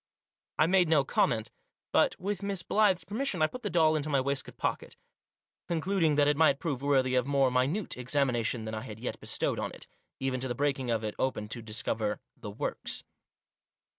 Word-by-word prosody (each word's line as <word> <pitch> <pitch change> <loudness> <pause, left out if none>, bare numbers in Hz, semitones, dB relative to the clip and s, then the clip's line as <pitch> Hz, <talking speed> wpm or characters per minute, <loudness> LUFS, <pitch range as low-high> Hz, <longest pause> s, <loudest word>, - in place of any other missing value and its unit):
I - - +5
made 180 -1 +3
no 155 -4 +5
comment, 115 -4 +1 0.4
but, - - +3
with 200 +1 -3
Miss 200 -3 -2
Blyth's 205 -3 +3
permis 230 +8 -3
sion, 180 - +1
I - - +7
put 250 +11 -5
the 210 - -2
doll 160 -3 +4
into 155 0 -2
my 140 -2 +3
waistcoat 140 +1 -2
pocket; - - -3 0.7
conclud 185 +3 0
ing 155 -2 +4
that 145 0 +4
it 145 - +3
might 150 -2 +4
prove 140 -5 -3
worthy 135 -2 +2
of 125 0 +2
more 135 -2 +3
minute 140 +11 0
exami 130 +2 +1
nation 115 -1 -1
than 110 - -5
I 110 - -3
had 110 0 -8
yet 125 - -4
bestowed - - 0
on - - -2
it - - -10 0.2
— - - -52
even 130 -1 -1
to 130 - -2
the 120 - -3
breaking 135 -2 0
of 115 -1 0
it 105 -1 -2
open 130 -5 -1
to 120 - -3
discover 110 -1 -1
" - - -58
the 105 - -5
works." 100 - -4
140 Hz, 215 wpm, -30 LUFS, 125-165 Hz, 0.7 s, I